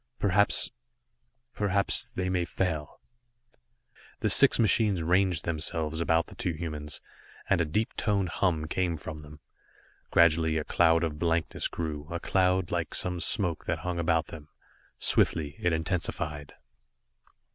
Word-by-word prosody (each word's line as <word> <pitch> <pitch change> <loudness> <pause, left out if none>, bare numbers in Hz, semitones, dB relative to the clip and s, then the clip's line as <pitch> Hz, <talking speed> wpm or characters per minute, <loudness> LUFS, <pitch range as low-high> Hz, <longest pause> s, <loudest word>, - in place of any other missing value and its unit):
Perhaps 100 +1 +2 0.8
perhaps 100 -1 0
they 90 0 -4
may 90 -1 0
fail." 80 -4 -3 1.2
The - - +1
six - - +7
machines 105 -5 +3
ranged 90 -1 +1
themselves 80 0 -2
about 80 0 +2
the - - -14
two 85 - -2
humans, 75 -2 -5 0.5
and - - +2
a - - +1
deep 105 +9 -1
toned 100 -4 0
hum 80 -2 0
came 85 +1 -1
from 75 +1 -8
them. 75 0 -13 0.7
Gradually 80 -1 +3
a 75 - -1
cloud 85 +1 +3
of 75 -2 -3
blankness 85 -1 -1
grew 75 -3 -5
a 85 - -3
cloud, 90 -1 +1
like - - -2
some 90 -1 0
smoke 85 -1 0
that - - -1
hung 90 -1 -2
about 80 -1 +1
them. 75 -3 -11 0.5
Swiftly 75 -2 +2
it 85 - +1
intensified. 80 -3 -3
85 Hz, 135 wpm, -28 LUFS, 80-90 Hz, 1.2 s, six